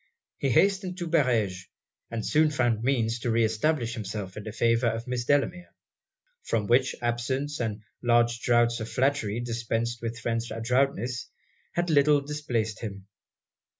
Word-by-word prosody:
He 140 - 0
hastened 190 - +2
to 175 -2 -4
Barege; 115 - +1 0.4
and 115 -2 -4
soon 155 0 +4
found 120 -6 +1
means 120 -2 +1
to 120 - -2
re 115 0 +3
establish 115 +2 0
himself 100 -4 -5
in 105 - -6
the 110 - -5
favour 115 +2 +2
of 115 0 -2
Miss 125 -1 -2
Delamere; 175 +6 0 0.7
from 110 -3 -1
which, 125 +5 +3
absence, 130 +5 -1
and 110 -3 -3 0.2
large 120 -1 +3
draughts 120 0 +2
of 110 0 -5
flattery 120 -3 0
dispensed 115 0 -2
with 115 0 -4
French 115 0 -2
adroitness, 120 +1 0 0.4
had 175 -1 0
a - - +2
little 145 0 +5
displaced 135 -7 -2
him. 100 -4 -7
120 Hz, 150 wpm, -27 LUFS, 115-140 Hz, 0.7 s, little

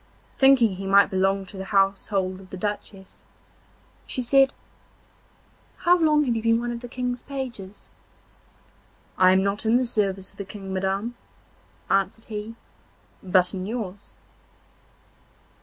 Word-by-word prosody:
Thinking 250 -8 +5
he 195 0 -5
might 200 0 +5
belong 195 +1 +1
to 190 +1 -11
the 190 - -5
household 195 -1 0
of 185 - -15
the 190 - -7
Duchess, 200 -1 -6 0.8
she 255 - -1
said: 270 +2 +4 1.3
'How 350 0 +4
long 305 -3 +3
have 245 -4 0
you 225 - -1
been 230 0 +3
one 240 0 -3
of 235 - -5
the 245 - -8
King's 245 0 -3
pages?' 240 -8 -7 1.3
'I 185 0 +6
am 190 0 +3
not 200 +2 -1
in 225 +1 +3
the 255 +1 +3
service 195 -5 -2
of - - -25
the 200 - -4
King, 195 -1 -8
madam,' 195 +5 -1 0.7
answered 195 +3 0
he, 215 +1 -6 0.7
'but 185 0 +2
in 185 0 -4
yours. 205 -4 -6
205 Hz, 140 wpm, -24 LUFS, 190-240 Hz, 1.3 s, I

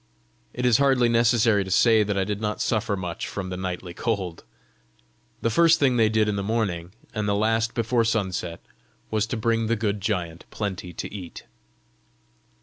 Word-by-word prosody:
It 125 - -3
is 120 -1 +4
hardly 135 -4 +4
necessary 115 -3 +3
to 95 - -8
say 110 +3 +5
that 105 -1 -1
I 95 - +2
did 105 +1 -3
not 105 -1 -2
suffer 110 -2 0
much 90 -2 -4
from 95 -2 -5
the 90 - -4
nightly 90 -1 -5
cold! 95 -4 -3 1.0
The 115 - +2
first 165 +6 +5
thing 135 -3 +3
they 115 -2 +4
did 110 -1 +2
in 105 -1 -1
the - - -1
morning, 100 -5 -2 0.2
and 105 -2 -2
the 100 - +2
last 115 +2 +1
before 115 0 +1
sunset, 95 -6 -2 0.5
was 110 -1 +1
to 120 - -3
bring 115 0 +1
the 115 - +2
good 105 -2 -2
giant 85 -2 -3
plenty 95 -4 -4
to 85 - -6
eat. 90 -5 -8
105 Hz, 180 wpm, -25 LUFS, 95-115 Hz, 1.0 s, say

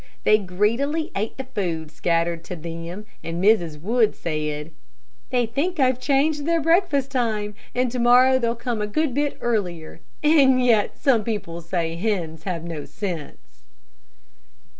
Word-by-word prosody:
They 215 - +5
greedily 230 - 0
ate 210 +3 -3
the 265 - -4
food 170 -10 -3
scattered 170 0 0
to 180 - -5
them, 170 +4 -7 0.2
and 165 0 -4
Mrs. 175 -6 +3
Wood 220 +5 +2
said, 150 -1 -3 0.6
"They 245 -3 +2
think 295 +10 -2
I've 255 -2 +3
changed 285 +3 +1
their 335 0 +3
breakfast 315 -4 +2
time, 220 -5 -1 0.2
and 250 -1 +1
to 250 - -3
morrow 250 +2 +5
they'll 235 -1 0
come 235 -2 -3
a 210 - -1
good 300 +5 0
bit 290 +2 -1
earlier. 175 -9 -2 0.2
And 280 -4 +5
yet 220 -4 +2
some 250 -7 +3
people 200 -6 -4
say 165 -1 -2
hens 170 -6 -2
have 175 -4 -3
no 165 -3 -5
sense." 150 - -7
215 Hz, 150 wpm, -23 LUFS, 170-260 Hz, 0.6 s, They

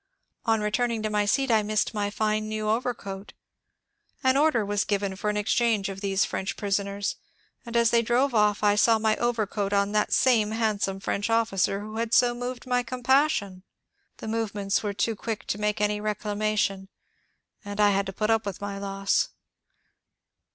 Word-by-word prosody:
On 225 -1 +3
returning 225 +1 0
to 215 - -1
my 210 -1 +1
seat 270 +4 +1
I 220 -1 +4
missed 210 +1 0
my 205 -1 -1
fine 215 +1 -1
new 215 0 -3
overcoat. 215 -4 -3 0.9
An 260 0 +4
order 275 -7 +3
was 205 0 0
given 200 -2 -1
for 210 +2 -2
an 210 - -1
exchange 215 -1 +1
of 195 0 -7
these 195 -1 +1
French 190 - -4
prisoners, 200 -1 -2 0.5
and 235 0 -1
as 235 -1 +4
they 235 - +4
drove 245 +4 +1
off 210 -1 +2
I 205 -1 +5
saw 225 +2 +4
my 220 0 +1
overcoat 215 -4 -1
on 200 0 +2
that 210 0 +1
same 230 -5 +3
handsome 210 -4 -1
French 200 +2 -2
officer 205 -3 +1
who 215 +1 -7
had 230 +1 0
so 245 -1 +4
moved 245 +1 -5
my 250 -1 +1
compassion! 250 -5 +1 0.6
The - - -8
movements 210 -3 -1
were 205 -2 -3
too 225 +2 0
quick 220 +1 -5
to 205 - -3
make 210 0 0
any 210 0 0
reclamation, 210 -2 -1 0.7
and 205 0 -7
I 205 -1 +5
had 200 0 0
to 195 - -5
put 215 +3 0
up 225 0 +2
with 200 -4 -5
my 200 -1 -5
loss. 195 0 0
210 Hz, 180 wpm, -26 LUFS, 200-230 Hz, 0.9 s, I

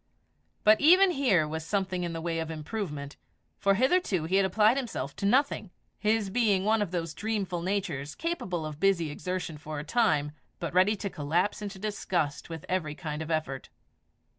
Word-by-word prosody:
But 215 +1 +6
even 365 +5 +7
here 225 - +2
was 160 +1 -4
something 185 +1 -1
in 170 - -2
the 165 0 -4
way 165 0 -2
of 160 0 -3
improvement, 155 -3 -5 0.4
for 195 0 +3
hitherto 255 - +2
he 180 +4 +1
had 195 -1 +4
applied 215 +5 +4
himself 215 - -4
to 200 - 0
nothing, 255 -3 +2 0.3
his 215 -2 +1
being 205 -4 +2
one 220 0 +3
of 205 - 0
those 165 -2 -3
dreamful 200 -5 -2
natures 170 -7 -2
capable 190 - -3
of 155 -1 -6
busy 170 -4 +2
exertion 180 -1 -4
for 155 0 -6
a 145 - -4
time, 150 -7 +2 0.3
but 170 -2 -4
ready 190 +4 +4
to 200 0 -4
collapse 170 +8 0
into 200 -1 -5
disgust 180 -8 -2
with 165 -2 -7
every 160 -5 -1
kind 150 0 -5
of 160 - -5
effort. 155 -5 -2
185 Hz, 180 wpm, -29 LUFS, 160-210 Hz, 0.4 s, even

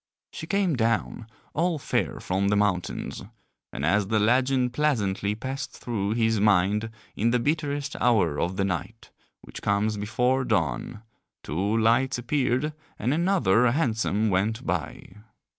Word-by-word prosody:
She 160 - -7
came 195 -4 +1
down 115 -1 -1 0.3
all 170 +1 +1
fair 140 - -2
from 95 +2 -1
the 105 - +2
mountains; 100 -4 -1 0.5
and 70 - -3
as 100 +4 +2
the 110 +1 +1
legend 125 +3 +2
pleasantly 105 -8 0
passed 135 +4 -5
through 105 -4 -2
his 115 -1 +1
mind 105 +2 +2 0.3
in 115 +3 +1
the 125 - +3
bitterest 145 +1 -1
hour 95 -12 +2
of 90 +4 -1
the 100 - +1
night, 95 +4 -5 0.3
which - - -10
comes 105 +1 0
before 125 +5 +1
dawn, 95 - -1 0.4
two 100 +8 -1
lights 120 +3 +2
appeared 130 +3 0 0.2
and 120 +6 0
another 155 - +3
hansom 110 -6 0
went 110 +6 0
by. 90 +2 -4
110 Hz, 140 wpm, -26 LUFS, 100-130 Hz, 0.5 s, the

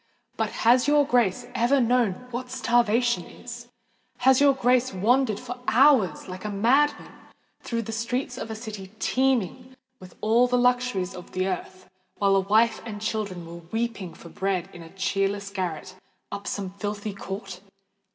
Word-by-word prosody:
But 220 -2 -1 0.2
has 245 +3 +5
your 295 0 +4
Grace 245 -3 +1
ever 255 +3 +3
known 240 -4 +3 0.2
what 250 +1 -5
starvation 240 -4 +2
is? 240 +3 -10 0.5
has 265 +2 +4
your 280 -1 +5
Grace 255 0 +2
wandered 220 +3 +2
for 250 0 -7
hours, 240 - +4
like 185 0 -8
a 210 - -3
madman, 250 +9 +2 0.5
through 230 -1 -3
the 225 - -6
streets 245 +3 -2
of 240 - -6
a 220 - -4
city 215 -4 -8
teeming 260 0 0 0.2
with 185 -1 -13
all 230 +3 +3
the 250 0 +1
luxuries 245 -7 +1
of 180 -1 -11
the 185 0 0
earth, 185 0 -5 0.3
while 200 -1 +3
a - - +5
wife 220 +4 +2
and 220 -2 -6
children 205 -5 -3
were 170 +1 -9
weeping 225 -6 -3
for 170 - -12
bread 190 0 -2
in 175 - -10
a 165 - -11
cheerless 195 +1 -1
garret 185 -3 -4 0.4
up 200 0 -6
some 195 -2 -3
filthy 205 +1 -4
court? 195 -1 -7
220 Hz, 160 wpm, -25 LUFS, 195-245 Hz, 0.5 s, has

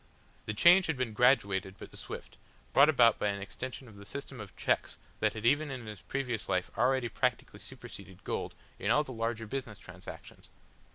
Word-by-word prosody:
The 105 - -2
change 175 - +7
had 160 -4 -1
been 125 -4 -1
graduated 100 -6 +3
but - - -11
swift, - - -8 0.3
brought 140 +3 +7
about 120 -6 +5
by - - +1
an 100 -1 -1
extension 125 +6 -6
of 105 -3 -14
the 100 - -11
system 140 +3 -7
of 100 -4 -10
cheques - - 0 0.2
that - - +2
had 110 0 -6
even 145 +5 +3
in 130 -4 -6
his 105 -3 -8
previous 125 -5 -3
life 90 -1 0
already 125 +1 +2
practically - - -1
superseded 95 -2 -10
gold - - -3 0.2
in - - -1
all 150 - +5
the 130 - -8
larger 115 0 -2
business 120 -2 -5
transactions. 95 -2 -11
115 Hz, 185 wpm, -31 LUFS, 100-135 Hz, 0.3 s, change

